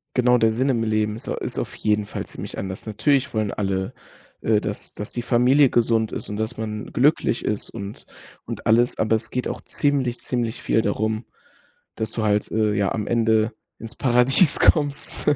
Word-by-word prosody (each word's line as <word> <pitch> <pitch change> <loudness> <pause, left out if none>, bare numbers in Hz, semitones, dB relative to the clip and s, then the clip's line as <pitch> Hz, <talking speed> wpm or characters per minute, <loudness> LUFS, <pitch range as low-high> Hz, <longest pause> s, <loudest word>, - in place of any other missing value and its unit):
Genau 125 -1 +4
der 115 -1 +3
Sinn 125 +5 0
im 115 -4 +1
Leben 110 -1 0
ist 115 - -7
au - - -1
ist - - -4
auf - - -3
jeden 105 -1 0
Fall - - -5
ziemlich - - -8
anders. 95 0 -5
Natürlich 140 +5 +1
wollen 110 -2 0
alle, 95 -2 -2 0.5
äh, 110 -1 +3
dass 105 -1 -5
dass 105 - -6
die 120 - -2
Familie 125 +4 +4
gesund 115 -2 +2
ist - - -4
und 105 - -5
dass 110 +3 -3
man 110 -1 -5
glücklich 135 -2 +2
ist 105 - -1
und 100 +1 -8 0.4
und - - -7
alles. 120 +3 +3
Aber 110 +1 +2
es 110 +1 -2
geht 125 - -2
auch - - -5
ziemlich, 135 -4 0
ziemlich 120 -3 -2
viel 115 - +2
darum, 110 +2 -1 0.7
dass 110 -1 -3
du 110 - -2
halt, 105 -1 +1
äh, 110 -1 +1
ja 100 -1 +1
am 105 -2 -2
Ende 110 -1 +2 0.3
ins 115 +2 -5
Paradies 130 +5 +4
kommst. 145 -3 +1
110 Hz, 190 wpm, -23 LUFS, 105-125 Hz, 0.7 s, Genau